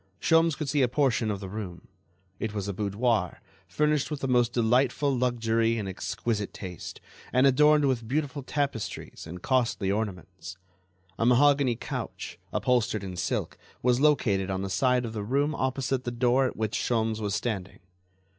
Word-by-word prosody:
Sholmes 165 -1 +3
could 150 0 -3
see 145 +1 +1
a 125 - +4
portion 125 -4 +1
of 100 -2 -2
the 95 - -5
room; 95 -3 -7 0.5
it 110 -1 -3
was 100 -1 -3
a 100 - -2
boudoir, 105 -1 0 0.3
furnished 150 -1 +1
with 150 -2 -4
the 135 - -1
most 120 -2 +3
delightful 125 +4 +2
luxury 115 -2 +1
and 105 -3 -3
exquisite 105 +3 -3
taste, 90 -3 -7 0.3
and 130 +2 +4
adorned 150 +2 +5
with 125 -4 0
beautiful 145 +2 -2
tapestries 135 - -4
and 90 +2 -9
costly 115 -7 +1
ornaments. 95 -3 -5 0.6
A 115 - +2
mahogany 135 0 +4
couch, - - -6
upholstered 115 -4 +1
in 95 -2 -6
silk, 90 - -2 0.2
was 125 +1 +3
located 105 -11 +2
on 95 0 -2
the 95 - -4
side 125 +2 +2
of 115 - -5
the 105 - -3
room 140 +7 +1
opposite 130 -1 -1
the - - -2
door 125 +2 +2
at - - -5
which 110 -1 -2
Sholmes 110 -2 0
was 105 -2 -1
standing. 100 -6 -3
120 Hz, 165 wpm, -27 LUFS, 105-135 Hz, 0.6 s, adorned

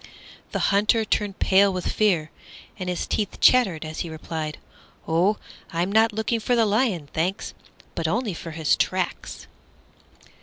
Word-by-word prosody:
The - - 0
Hunter 215 +2 +3
turned 205 -2 -1
pale 195 +1 +4
with 185 -1 -4
fear, 175 -8 +1 0.5
and 180 -1 -3
his 180 - -2
teeth 210 -2 -2
chattered 190 -11 +4
as 155 0 -6
he 170 - -3
replied, 155 -1 -5 0.5
"Oh, 180 +6 +2 0.3
I'm 175 +3 -1
not 220 +2 +4
looking 220 +2 -1
for 245 +3 +1
the 230 -1 +3
lion, 205 - 0
thanks, 180 +5 -2 0.4
but 165 -1 -2
only 220 +3 -1
for 165 - -7
his 160 -1 +1
tracks." - - -2
190 Hz, 150 wpm, -24 LUFS, 165-215 Hz, 0.5 s, pale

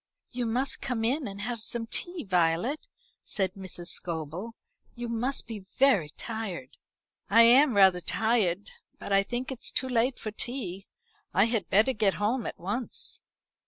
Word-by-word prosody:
"You 245 -2 -2
must 250 +5 0
come 240 -4 -1
in 265 +4 0
and 200 0 -7
have 235 +1 -3
some 230 +1 -1
tea, 350 +9 -4
Violet," 180 - +1 0.4
said 190 -3 0
Mrs. 185 -3 -5
Scobel. 170 +7 -3 0.4
"You 240 0 -5
must 240 +4 -1
be 225 -2 -6
very 195 - +2
tired." 195 - -6 0.5
"I 230 +3 +7
am 250 +2 +6
rather 190 -3 +6
tired; 205 -2 0 0.3
but 200 - -4
I 195 - +6
think 245 +6 -4
it's 255 - -1
too 260 - -1
late 250 +1 +1
for 215 - -5
tea. 205 -5 -5 0.5
I 200 - +6
had 225 -7 -1
better 220 +7 +4
get 210 -4 +2
home 225 +4 0
at - - -6
once." 210 +7 -4
225 Hz, 160 wpm, -28 LUFS, 190-245 Hz, 0.5 s, I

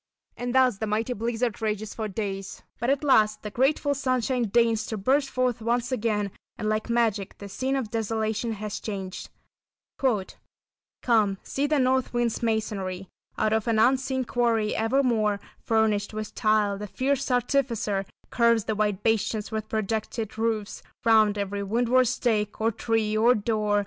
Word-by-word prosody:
And 245 +1 -4
thus 255 -6 +4
the 220 - -2
mighty 220 +4 0
blizzard 230 +1 -2
rages 215 -1 -2
for 220 -1 -3
days. 195 -2 -5 0.2
But 240 - 0
at 280 +1 +1
last 215 -6 +3
the 210 - -5
grateful 285 +4 +2
sunshine 255 -2 0
deigns 225 0 +2
to 220 - -3
burst 270 +7 +2
forth 250 -3 0
once 240 +2 0
again, 210 -4 0 0.3
and 215 - -3
like 215 +2 -1
magic 225 -5 0
the 200 - -8
scene 260 +7 -2
of 250 -6 -3
desolation 225 0 -1
has 215 0 -5
changed: 195 -3 -6 1.7
"Come, 215 -5 +3
see 280 +2 -1
the 300 0 +2
North 260 -1 +1
Wind's 240 -1 0
masonry 200 -5 -2 0.3
Out 215 - +1
of 220 +1 0
an 225 -1 +2
unseen 260 +2 +2
quarry 230 -3 +1
evermore 225 -3 +1 0.2
Furnished 215 -2 +1
with 215 0 -5
tile, 215 -3 +1
the 210 - -5
fierce 275 +6 -1
artificer 240 -6 0 0.2
Curves 235 -2 +3
the 220 - -1
white 210 -2 -1
bastions 220 -1 0
with 215 0 -4
projected 220 0 -2
roof 220 -2 -2 0.2
Round 215 -2 +5
every 200 0 -2
windward 240 +5 +2
stake, 215 -3 0
or 225 +1 +2
tree 220 -1 0
or 235 +3 +5
door. 210 -1 +1
220 Hz, 155 wpm, -26 LUFS, 210-245 Hz, 1.7 s, Round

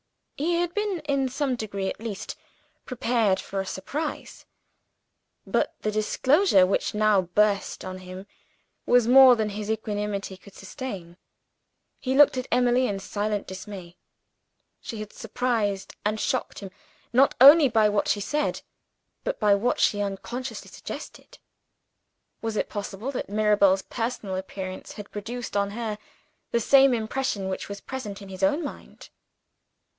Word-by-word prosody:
He 335 +5 0
had 345 0 0
been, 415 -5 -1
in 275 -3 0
some 275 0 -1
degree 200 -4 -4
at - - -4
least, 220 -3 -6 0.5
prepared 230 -5 +1
for 195 0 -4
a - - -6
surprise 295 +13 -5 1.0
but - - 0
the 215 - -1
disclosure 215 - +3
which 195 +2 -1
now 210 -2 +4
burst 200 +3 0
on 185 0 -6
him 185 +1 -9 0.6
was 245 -2 +4
more 260 0 +9
than 220 -2 -1
his 210 +1 -5
equanimity 205 -3 -3
could 195 +1 -17
sustain. 195 -6 -7 0.8
He 260 0 -1
looked 290 -1 +6
at 255 -1 -3
Emily 245 +1 +3
in 200 - -2
silent 205 +1 -2
dismay. 190 -2 -9 0.9
She 225 - -7
had 215 -1 -7
surprised 220 -4 -2
and 215 +1 -1
shocked 260 +2 -2
him, 195 -2 -8 0.4
not 270 +3 +4
only 285 +2 +9
by 220 -2 +4
what 205 -1 0
she 205 - +1
said, 300 +8 -1 0.6
but - - -3
by 210 -2 +4
what 210 +5 +1
she 205 - +2
unconsciously 225 +4 -5
suggested. - - -9 1.0
Was 225 -1 -3
it - - -1
possible 205 +4 -5
that 255 - -5
Mirabel's 205 -2 +3
personal 225 -5 -4
appearance 190 0 -6
had 205 -1 -10
produced 235 +4 -6
on 200 0 +1
her 215 -1 -4 0.5
the 235 - +1
same 270 +2 +5
impression 220 -3 -2
which 190 - -4
was 200 0 -6
present 210 -7 -6
in 195 - -11
his 190 0 -8
own 285 - +2
mind? 285 - -9
215 Hz, 145 wpm, -26 LUFS, 200-255 Hz, 1.0 s, more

